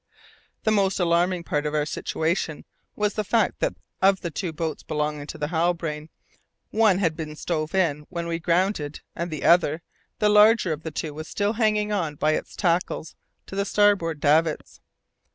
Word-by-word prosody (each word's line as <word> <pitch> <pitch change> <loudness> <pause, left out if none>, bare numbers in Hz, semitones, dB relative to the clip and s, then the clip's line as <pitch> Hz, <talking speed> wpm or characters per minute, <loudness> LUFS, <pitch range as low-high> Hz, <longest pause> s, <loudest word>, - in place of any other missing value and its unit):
The 220 - +2
most 195 -2 +2
alarming 175 0 +2
part 150 -2 -1
of 150 - -3
our 150 -1 +1
situation 160 +1 -2 0.3
was 210 0 0
the 215 - -1
fact 220 +1 +1
that - - 0 0.3
of 190 0 +4
the 170 - -4
two 175 +2 -3
boats 160 0 -4
belonging 150 -1 -3
to 160 - -7
the 150 -1 -3
Halbrane, 165 -2 -1 0.6
one 215 -4 +4
had 165 -5 +1
been 155 -2 -6
stove 155 +1 -3
in 150 -6 +1
when 170 -2 -4
we 165 0 -2
grounded, 170 -3 0
and 170 +1 -3
the 155 -3 -5
other, 170 -2 +4 0.3
the 210 - +2
larger 210 -3 +5
of 150 - -7
the 160 - -5
two, 155 0 -4
was 155 +1 -7
still 205 +1 -1
hanging 215 -2 +1
on 165 -8 -1
by 150 +2 +1
its - - -3
tackles 170 -3 -1 0.3
to - - -9
the 200 - +1
starboard 200 -6 +2
davits. 155 +2 +1
170 Hz, 180 wpm, -25 LUFS, 155-195 Hz, 0.6 s, larger